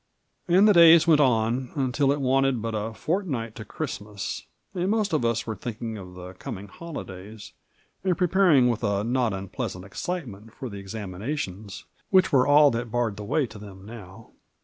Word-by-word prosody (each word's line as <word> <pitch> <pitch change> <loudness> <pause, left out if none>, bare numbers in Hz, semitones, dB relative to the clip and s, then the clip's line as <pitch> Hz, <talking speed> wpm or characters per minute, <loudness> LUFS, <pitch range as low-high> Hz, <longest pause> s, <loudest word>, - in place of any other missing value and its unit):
And 185 +4 +5
the 210 - +6
days 170 -2 +8
went 155 -3 +5
on, 120 0 +1
until 135 0 +1
it 145 - 0
wanted 135 -1 +2
but 115 +1 -4
a 110 +1 -2
fortnight 135 - -3
to 110 - -8
Christmas, 105 -7 -6 0.3
and 180 0 -1
most 215 -3 0
of 155 - +1
us 115 -1 0
were 110 - -4
thinking 115 +2 -5
of 90 -1 -11
the 90 0 -9
com 95 - -7
ing 100 +1 -11
holidays, 105 - -9 0.5
and 185 -3 +1
preparing 180 -8 +4
with 120 -1 -1
a 100 -1 0
not 120 0 +1
unpleasant 95 -1 -5
excite 175 - -4
ment 110 0 -12
for 130 - -6
the 100 -2 -8
examinations, 100 +1 -6 0.2
which 185 -1 +4
were 130 -2 +4
all 145 0 +6
that 115 0 -3
barred 120 -2 -1
the 105 - -7
way 140 +7 +1
to 110 -3 -11
them 100 -2 -12
now. 110 -1 -12
115 Hz, 185 wpm, -25 LUFS, 105-150 Hz, 0.5 s, days